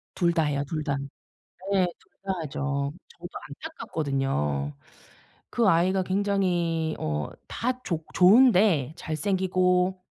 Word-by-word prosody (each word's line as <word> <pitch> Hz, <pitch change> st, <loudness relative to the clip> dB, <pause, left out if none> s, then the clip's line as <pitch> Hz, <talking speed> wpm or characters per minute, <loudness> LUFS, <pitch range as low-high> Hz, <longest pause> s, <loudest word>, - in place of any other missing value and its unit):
둘 170 Hz, -1 st, +2 dB
다 165 Hz, -2 st, +2 dB
해요 145 Hz, -1 st, 0 dB
둘 155 Hz, 0 st, -3 dB
다. 140 Hz, -2 st, -1 dB, 0.7 s
네. 190 Hz, -2 st, +4 dB
둘 -, -, -28 dB
다 195 Hz, -, 0 dB
하죠. 140 Hz, -1 st, -2 dB, 0.2 s
저도 175 Hz, +1 st, -8 dB
안타깝거든요. 135 Hz, -, -2 dB, 0.8 s
그 230 Hz, -4 st, +2 dB
아이가 185 Hz, +3 st, +3 dB
굉장히 180 Hz, -5 st, 0 dB
어 75 Hz, -1 st, -2 dB, 0.2 s
다 255 Hz, +1 st, -2 dB
좋 160 Hz, -3 st, -2 dB
좋은데 185 Hz, -, +5 dB
잘생기고 185 Hz, +2 st, +1 dB
170 Hz, 215 characters per minute, -26 LUFS, 145-190 Hz, 0.8 s, 좋은데